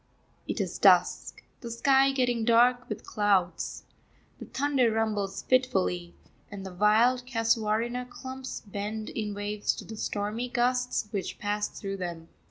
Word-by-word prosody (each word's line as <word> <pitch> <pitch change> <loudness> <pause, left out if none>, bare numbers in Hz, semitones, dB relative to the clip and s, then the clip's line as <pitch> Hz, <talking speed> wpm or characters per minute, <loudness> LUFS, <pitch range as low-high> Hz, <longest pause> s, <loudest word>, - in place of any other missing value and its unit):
It - - -3
is - - -3
dusk, - - +3 0.2
the 235 - -7
sky 270 +3 +4
getting 245 -4 +1
dark 245 +2 +4
with 215 - -5
clouds. 195 -5 0 0.6
The - - -7
thunder 270 -3 +1
rumbles 215 -3 -1
fitfully, 190 -9 +1 0.3
and 200 -2 -8
the 190 - -7
wild 230 +6 +3
casuarina 230 +1 0
clumps 260 +1 -7
bend 210 +1 -5
in 210 -2 -3
waves 205 0 -1
to - - -8
the 220 - -8
stormy 215 +4 -2
gusts 250 -1 0
which 195 -3 -3
pass 205 0 -1
through 195 -1 -6
them. 170 -3 -6
220 Hz, 140 wpm, -28 LUFS, 205-250 Hz, 0.6 s, sky